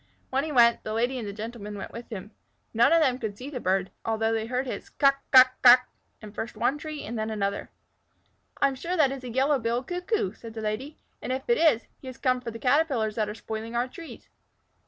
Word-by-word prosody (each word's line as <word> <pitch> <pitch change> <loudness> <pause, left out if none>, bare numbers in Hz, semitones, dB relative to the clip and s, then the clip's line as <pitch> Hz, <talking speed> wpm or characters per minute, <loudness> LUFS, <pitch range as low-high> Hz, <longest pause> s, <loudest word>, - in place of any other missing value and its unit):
When 270 +1 +1
he 315 - -4
went, 235 -3 +5
the 215 - -4
Lady 245 +3 0
and 220 - -5
the - - -4
Gentleman 210 0 -7
went 195 - -7
with 235 +1 -9
him. 210 -1 -7 0.4
None 230 +5 +4
of 330 0 +5
them 255 -2 +1
could 215 -4 -4
see 265 +5 -8
the 255 - -4
bird, 190 -2 0
although 225 0 0
they 225 0 -1
heard 250 +2 -1
his 255 - -6
"kuk 275 -1 +3
kuk 255 -1 +8
kuk!" 250 0 +9 0.4
in 210 -1 -9
first 225 +2 -6
one 295 - +1
tree 305 -1 -6
and 230 +1 -5
then 215 0 -2
another. 200 -2 -2 0.9
"I 280 - +5
am 275 - -2
sure 340 +8 -3
that 285 -4 +4
is 270 -1 -6
a 250 - -6
Yellow 270 +4 +2
billed 235 +2 -1
Cuckoo," 360 - -2
said 225 0 -11
the 220 - -5
Lady, 220 +8 -4 0.2
"and - - -4
if 260 +1 -3
it 475 - +3
is, 295 -8 +4 0.2
he 265 - -12
has 255 - -8
come 255 -1 +1
for 245 - -5
the 230 - -7
Caterpillars 250 -4 +1
that 215 -1 -1
are 210 - -6
spoiling 225 +1 -6
our 240 +2 +1
trees." 330 +5 -11
240 Hz, 240 wpm, -27 LUFS, 220-270 Hz, 0.9 s, kuk